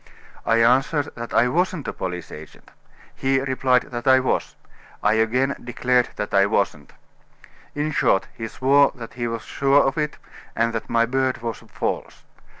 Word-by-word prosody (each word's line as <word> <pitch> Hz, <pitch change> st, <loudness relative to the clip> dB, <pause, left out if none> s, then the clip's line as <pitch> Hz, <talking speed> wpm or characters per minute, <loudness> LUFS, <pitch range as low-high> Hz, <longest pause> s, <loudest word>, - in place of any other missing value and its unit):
I 115 Hz, 0 st, +4 dB
answered 135 Hz, +5 st, +2 dB
that 120 Hz, 0 st, -7 dB
I 120 Hz, -, +4 dB
wasn't 175 Hz, +2 st, -1 dB
a -, -, -3 dB
police 90 Hz, -2 st, -5 dB
agent. 75 Hz, 0 st, -12 dB, 0.4 s
He 135 Hz, 0 st, +1 dB
replied 130 Hz, -1 st, +1 dB
that 120 Hz, +1 st, -5 dB
I 130 Hz, 0 st, +7 dB
was. 130 Hz, -, -1 dB, 0.5 s
I 105 Hz, -, +4 dB
again 125 Hz, +5 st, +1 dB
declared 125 Hz, 0 st, +1 dB
that 105 Hz, -, -5 dB
I 100 Hz, 0 st, +5 dB
wasn't. 100 Hz, -8 st, -1 dB, 0.8 s
In 150 Hz, +1 st, -1 dB
short, 95 Hz, -8 st, +2 dB
he 115 Hz, -2 st, -5 dB
swore 140 Hz, +4 st, +3 dB
that 115 Hz, -2 st, -9 dB
he 120 Hz, 0 st, -3 dB
was 115 Hz, -1 st, -4 dB
sure 140 Hz, +1 st, +3 dB
of 135 Hz, +2 st, 0 dB
it, 150 Hz, -1 st, -2 dB, 0.4 s
and 115 Hz, 0 st, +1 dB
that 115 Hz, -, -4 dB
my 115 Hz, 0 st, +3 dB
beard 130 Hz, 0 st, -1 dB
was 115 Hz, -3 st, -4 dB
false. -, -, -4 dB
125 Hz, 165 wpm, -22 LUFS, 115-135 Hz, 0.8 s, I